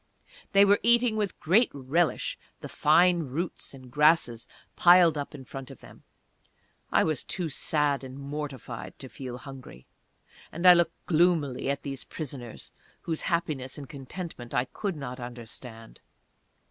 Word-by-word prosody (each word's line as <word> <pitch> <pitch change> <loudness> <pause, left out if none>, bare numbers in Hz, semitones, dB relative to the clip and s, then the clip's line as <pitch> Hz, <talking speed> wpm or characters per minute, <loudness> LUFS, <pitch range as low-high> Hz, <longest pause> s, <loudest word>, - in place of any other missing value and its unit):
They 200 0 +7
were 200 +1 +4
eating 235 -1 +4
with 210 -3 -2
great 210 +9 +4
relish 145 +5 0 0.3
the - - -6
fine 175 +4 +4
roots 160 +4 -4
and 130 -2 -14
grasses 150 -5 +3 0.3
piled 175 -2 +6
up 145 0 -5
in 135 -2 -10
front 135 -1 -8
of - - -11
them. - - -15 0.9
I - - +4
was 155 -5 -1
too 175 -3 -3
sad 145 -1 0
and 130 0 -8
mortified 140 -4 -6
to 135 - -9
feel 125 -1 -7
hungry, 130 - -11 0.7
and 170 +3 -5
I 180 - +11
looked 175 -1 +1
gloomily 160 -6 +2
at 140 0 -2
these 135 -2 -4
prisoners, 130 -7 -7 0.3
whose 160 -2 -3
happiness 155 -7 -2
and 140 -2 -8
contentment 140 -2 -8
I 125 - +2
could 195 +7 -4
not 135 -3 -6
understand. 120 -1 -10
145 Hz, 145 wpm, -28 LUFS, 130-170 Hz, 0.9 s, I